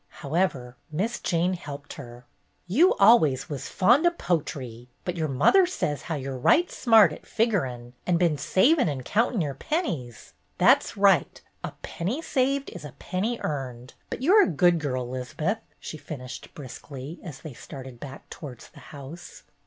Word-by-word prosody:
However, 140 -6 -1
Miss 205 +10 -2
Jane 175 +2 +1
helped 145 -5 -7
her. 120 -2 -11 0.4
"You 280 - +4
always 195 - +5
was 140 -3 -5
fond 245 - +4
o' - - +7
potry, 140 - -3 0.2
but 180 - -2
your 160 -2 -1
mother 250 - +4
says 150 - -2
how 160 - -4
you're 135 -2 -5
right 345 - +4
smart 225 -4 +5
at - - -12
figurin' 135 - -1
and 175 -2 +3
been 170 -3 +2
savin' 255 - +3
and 130 -4 -5
countin' 225 -1 +1
your 145 -3 -2
pennies. 145 - -4 0.2
That - - +6
's - - -9
right. - - +3 0.2
A - - -5
penny 200 - -3
saved 275 -3 0
is 175 - -9
a 145 -4 -9
penny 190 - -3
earned. 130 -4 -4 0.2
But - - -5
you 345 +8 +4
're 430 - +8
a - - +4
good 175 +1 +3
girl, 130 -5 -2
'Liz'beth," 130 - -3 0.2
she 155 - -7
finished 130 -5 -8
briskly, 140 +2 -9
as 155 -7 -9
they 155 -4 -8
started 130 -1 -10
back 135 0 -10
towards 130 -7 -9
the 150 - -16
house. 145 +4 -10
155 Hz, 170 wpm, -26 LUFS, 130-210 Hz, 0.4 s, re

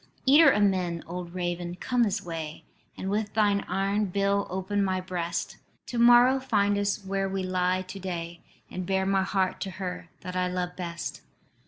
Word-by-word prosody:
"Eater 290 +5 +8
of 210 - +3
men, 180 -4 +1
old 175 0 -7
raven, 175 -1 -3
come 245 +6 0
this 205 -3 +1
way, 160 -2 -6 0.3
And 190 - -5
with 205 +1 -1
thine 205 -2 +3
iron 200 +2 0
bill 200 +1 0
open 190 +2 -1
my 190 -1 0
breast: 180 -2 -3 0.3
To 240 - -3
morrow 245 +2 +7
find 205 -6 +1
us 205 0 -1
where 195 0 -1
we 190 0 -2
lie 185 0 0
to 185 +1 -9
day, 170 -2 -5 0.3
And 180 -1 -5
bear 190 0 +1
my 195 0 +2
heart 190 -1 0
to 195 - -2
her 185 -2 -6
that 180 0 -6
I 180 0 +1
love 180 0 -3
best. 170 -2 -5
190 Hz, 180 wpm, -27 LUFS, 180-200 Hz, 0.3 s, Eater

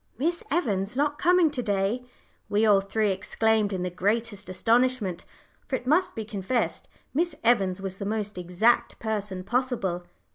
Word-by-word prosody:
"Miss 335 +7 0
Evans 215 - 0
not 290 +1 +1
coming 355 -2 +4
to 260 - -2
day!" 205 +2 0 0.5
we 210 +2 +3
all 205 -2 +5
three 205 +1 0
exclaimed 210 +2 +1
in 185 -2 -2
the 180 - -2
greatest 205 +2 -1
astonishment, 225 -2 +1 0.4
for 265 - -1
it 250 - -5
must 330 +8 +2
be 220 - -4
confessed 210 +4 -2 0.3
Miss 330 +2 0
Evans 195 -6 +3
was 195 -1 -5
the 200 - -3
most 210 0 -2
exact 180 +7 +2
person 205 -4 -3
possible. 195 -7 -1
215 Hz, 155 wpm, -26 LUFS, 195-250 Hz, 0.5 s, all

